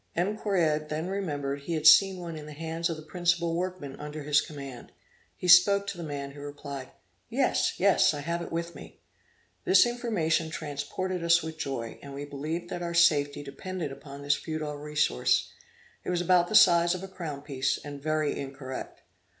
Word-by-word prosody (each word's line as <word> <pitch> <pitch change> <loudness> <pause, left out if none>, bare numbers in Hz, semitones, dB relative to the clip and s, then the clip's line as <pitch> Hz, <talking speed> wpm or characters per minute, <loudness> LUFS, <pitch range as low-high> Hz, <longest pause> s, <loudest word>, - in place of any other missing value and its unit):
M. 185 +5 0
Correard 160 -8 0
then 155 +4 -3
remembered 145 -8 -3
he 165 +4 -4
had 155 -1 -3
seen 190 +4 +7
one 170 -2 -6
in 150 -1 -8
the 150 - -8
hands 165 +2 -3
of 165 - -3
the 155 - -10
principal 170 0 0
workmen 175 -6 -4
under 150 0 -6
his 150 +1 +3
command; 140 -5 -9 0.5
he 180 - -4
spoke 200 +3 +7
to 200 -1 -4
the 175 - -7
man, 140 -2 -5
who 145 +1 -11
replied, 145 -2 -7 0.4
'Yes, - - +1
yes, - - +4
I 145 - -5
have 170 +3 -2
it 170 - -7
with 170 +1 -3
me.' - - -12 0.6
This 375 -6 +6
information 210 -10 0
transported 170 +4 -4
us 170 0 +4
with 160 0 -7
joy, 120 -6 -4
and 140 -1 -9
we 140 +1 -5
believed 155 +5 -5
that 175 - -4
our 170 0 -3
safety 145 -4 +3
depended 160 +3 -5
upon 140 +1 -10
this 145 +1 +3
futile 155 -2 -4
resource; 150 - +1 0.5
it - - -5
was 175 -1 0
about 175 0 +4
the 215 - -1
size 175 -4 +6
of 185 - -7
a - - -5
crown 160 -7 -7
piece, 140 -2 -1
and 145 -1 -9
very 155 0 0
incorrect. 135 -1 -7
155 Hz, 190 wpm, -28 LUFS, 145-175 Hz, 0.6 s, seen